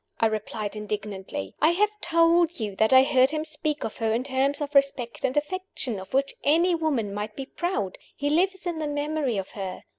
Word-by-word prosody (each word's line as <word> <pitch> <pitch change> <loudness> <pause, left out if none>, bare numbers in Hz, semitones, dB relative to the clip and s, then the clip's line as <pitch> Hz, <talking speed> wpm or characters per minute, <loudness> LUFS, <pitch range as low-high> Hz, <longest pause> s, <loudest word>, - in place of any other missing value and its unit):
I - - +3
replied, 215 -1 -2
indignantly. 205 - -5
"I 320 +2 +5
have 420 +4 +2
told 335 0 +3
you 210 -3 -3
that 220 +2 +3
I 260 0 +8
heard 260 -1 +4
him 310 +1 -2
speak 305 -1 -3
of 220 - -5
her 225 -1 0
in 240 - 0
terms 275 +1 +1
of 295 -1 -4
respect 255 -6 +1
and 265 +1 0
affection 295 - -3
of 190 - -10
which 275 +1 +1
any 335 +5 +4
woman 285 -11 0
might 210 +1 -4
be 270 - -5
proud. 295 - -3 0.2
He 290 0 -1
lives 380 +4 +1
in 340 -2 -2
the 305 - -2
memory 290 -4 -1
of 195 -1 -4
her. 190 -3 -6
275 Hz, 205 wpm, -26 LUFS, 215-315 Hz, 0.2 s, I